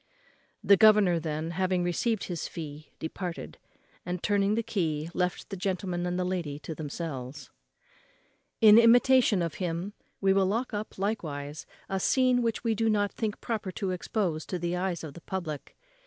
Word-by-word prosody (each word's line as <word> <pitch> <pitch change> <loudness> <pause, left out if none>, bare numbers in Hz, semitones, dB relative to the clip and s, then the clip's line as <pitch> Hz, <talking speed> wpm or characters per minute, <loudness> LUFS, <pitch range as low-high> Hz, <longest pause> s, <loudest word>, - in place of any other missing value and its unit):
The 200 - +6
governor, 210 -5 +6
then, 155 0 -3
having 185 0 0
received 195 +5 0
his 175 -4 -4
fee, 155 -2 -8
departed; 170 +2 -6 0.4
and, 180 0 -4
turning 205 0 +2
the 230 - 0
key, 160 -6 -2
left 180 0 -2
the - - -2
gentleman 180 -2 -2
and 180 0 -1
the 185 - 0
lady 175 -6 -2
to 160 - -5
themselves. 145 -3 -6 1.1
In 215 0 +9
imitation 235 -4 +5
of 165 -3 -2
him 180 +3 -2 0.3
we 195 -1 +3
will 195 -1 +3
lock 230 +5 -1
up 210 +1 -5
likewise 155 -8 -3 0.2
a 195 - -1
scene 255 +4 +3
which 230 -1 -1
we 230 -2 +2
do 225 +1 +1
not 205 -1 +1
think 215 -2 -3
proper 215 -5 -3
to 195 -3 -2
expose 180 -3 -2
to 180 - -2
the 175 0 -2
eyes 180 -2 -2
of 155 -3 -7
the 170 - -12
public. 165 -6 -5
185 Hz, 170 wpm, -28 LUFS, 165-210 Hz, 1.1 s, In